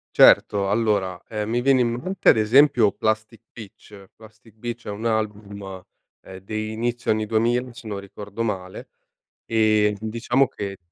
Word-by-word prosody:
Certo. 100 -1 +5
Allora, 100 -5 0
ehm, 105 -1 -3
mi 120 +2 0
viene 135 0 +3
in 120 -1 +1
mente 185 +10 0
ad - - +6
esempio 115 0 +4
Plastic 110 +1 -2
Beach. 100 -2 -13
Plastic 110 0 -18
Beach 120 +1 -7
è - - -4
un 105 +3 -6
album, 105 -2 -2 0.6
ehm 95 - -11
dei 110 +1 -4
inizio 120 +2 -2
anni 110 0 0
2000 120 +3 0
se 120 -1 -12
non 100 -2 -4
ricordo 100 +2 -8
male, 95 -4 -5 0.6
ehm 110 -2 +2
di 110 +1 -5
diciamo 120 +4 +1
che 100 -3 -6
110 Hz, 160 wpm, -23 LUFS, 105-115 Hz, 0.6 s, ad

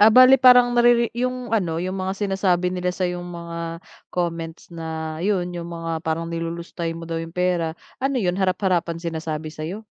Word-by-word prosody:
Ah, 210 +2 +8
bale 255 +3 +9
parang 245 -1 +7
nariri 240 0 +5
yung 250 -1 -2
ano 170 -6 0
yung 185 +2 -2
mga 190 0 -3
sinasabi 190 -3 +1
nila 180 0 0
sa'yong 180 -1 -2
mga 170 -1 -6 0.5
comments 165 -2 -3
na 160 -1 -5
yun, 190 -2 +1
yung 170 0 -5
mga 165 -1 -4
parang 165 0 -1
nilulustay 170 0 -4
mo 165 - -8
daw 165 - -4
yung 165 - -7
pera. 175 -2 0 0.2
Ano 270 -1 +1
yun, 180 -4 +1
harap-harapan 185 -3 0
sinasabi 160 -2 -4
sa'yo? 180 +9 -6
175 Hz, 170 wpm, -23 LUFS, 165-200 Hz, 0.5 s, bale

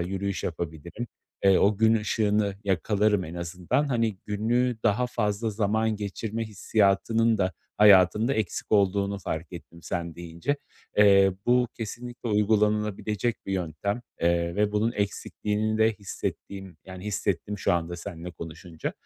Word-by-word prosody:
yürüyüş 95 +2 -2
yapabilirim. 85 +6 -5 0.4
Eee, 95 -1 +6
o 100 0 +3
gün 110 +1 +4
ışığını 105 -1 +1
yakalarım 100 +1 +2
en 80 - -8
azından. 90 - -1
Hani, 115 -6 0
günü 120 +4 +1
daha 125 +5 +2
fazla 110 -1 -1
zaman 110 +1 0
geçirme 110 +2 -4
hissiyatının 110 +2 +2
da 95 -2 +1 0.3
hayatımda 105 +4 +6
eksik 110 0 -3
olduğunu 100 0 +2
fark 85 0 -5
ettim 85 -1 -11
sen 85 -2 -4
deyince. 85 - -3 0.4
Eee, 100 -2 +6
bu 125 -1 +4
kesinlikle 120 +2 -6
uygulanılabilecek 105 +1 +1
bir 95 - -2
yöntem, 95 +6 -2 0.2
eee, 85 0 +1
ve 105 0 +2
bunun 110 +3 +1
eksikliğini 105 +1 -2
de 110 0 +4
hissettiğim 95 -2 -6
yani, 95 +1 -9
hissettim 100 -1 -2
şu - - +1
anda 85 0 -1
seninle 85 0 -7
konuşunca. 80 0 -7
100 Hz, 130 wpm, -27 LUFS, 90-110 Hz, 0.4 s, Eee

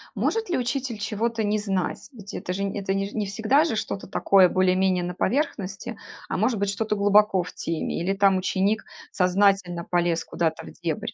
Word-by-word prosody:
может 450 -3 -1
ли 350 - +1
учитель 250 -2 -2
чего-то 225 +2 -2
не 210 +1 +1
знать? 195 0 -2
Ведь 205 -4 -11
это 180 - -4
же, 200 +2 -2
нь 200 +1 -3
это, 195 -1 -1
не 195 0 -1
ж - - -15
не 215 -2 -1
всегда 220 +9 +2
же 320 - -1
что-то 205 -2 -4
такое 190 -2 +4
более-менее 185 0 +2
на 180 0 -3
поверхности, 205 - -2 0.3
а - - -1
может 220 +2 +1
быть, 200 0 0
что-то 210 +1 -1
глубоко 205 -2 +4
в 180 - -10
теме 165 0 -3
или, 190 +3 0
там, 195 -1 +4
ученик 195 +3 0 0.3
сознательно 185 -2 +2
полез 170 -2 0
куда-то 160 -2 -2
в - - -10
дебри? 165 -3 -4
195 Hz, 195 wpm, -25 LUFS, 185-215 Hz, 0.3 s, такое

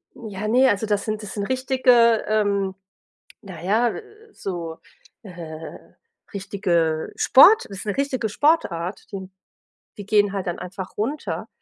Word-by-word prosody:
Ja, 210 -2 -6
ne, 255 +4 +4
also 205 0 0
das 205 -1 -1
sind 215 0 -3
das 200 - -7
sind 205 - -3
richtige, 250 -2 +3
ähm, 200 -3 0 0.7
naja, 200 +5 0 0.4
so, 170 - -6 0.4
äh, 165 -5 -9 0.6
richtige 180 -5 -1
Sport 425 +12 +6
ist 200 +1 -9
'ne 205 - -2
richtige 265 -5 -1
Sportart, 205 - 0
die 190 -2 -7 0.7
die 205 - -8
gehen 205 -1 +3
halt 195 -2 -3
dann 175 - -3
einfach 180 +1 -8
runter. 270 +9 -3
205 Hz, 130 wpm, -23 LUFS, 185-230 Hz, 0.7 s, Sport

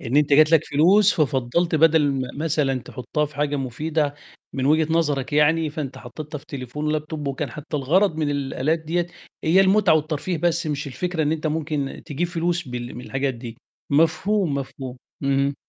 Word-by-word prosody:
إن 125 +2 -2
أنت 150 -1 +3
جات 155 +3 +6
لك 160 -1 +5
فلوس 185 +8 +4
ففضّلت 150 +3 +1
بدل 160 -2 +4
ما 130 -2 -2 0.2
مثلًا 140 -5 +1
تحطّها 135 +5 -3
في 145 -1 -16
حاجة 145 0 0
مفيدة 145 +3 -1 0.4
من 130 -1 -1
وجهة 155 +2 +3
نظرك 145 -6 0
يعني، 150 +1 +3
فأنت 145 -3 -5
حطّيتها 150 +4 -8
في 140 - -20
تليفون 145 -1 -5
ولاب 155 0 -1
توب 155 -2 -5
وكان 135 - -3
حتى 150 +1 -5
الغرض 165 +6 +2
من 155 -2 0
الآلات 145 +2 -1
دِيّة 170 +2 -1 0.4
هي 175 +5 +5
المُتعة 195 -3 +4
والترفيه، 155 +3 -1
بس 170 +1 0
مش 145 -1 -2
الفكرة 165 +5 -2
إن 150 0 +1
أنت 160 0 -2
ممكن 150 -3 -2
تجيب 155 +5 -1
فلوس 175 -2 -2
بال 120 0 -5
من 125 - -8
الحاجات 135 0 -2
دي. 115 -1 -8 0.3
مفهوم، 165 +3 +2
مفهوم. 135 -2 -5 0.3
اهم. 140 +1 +1
150 Hz, 180 wpm, -23 LUFS, 140-160 Hz, 0.4 s, جات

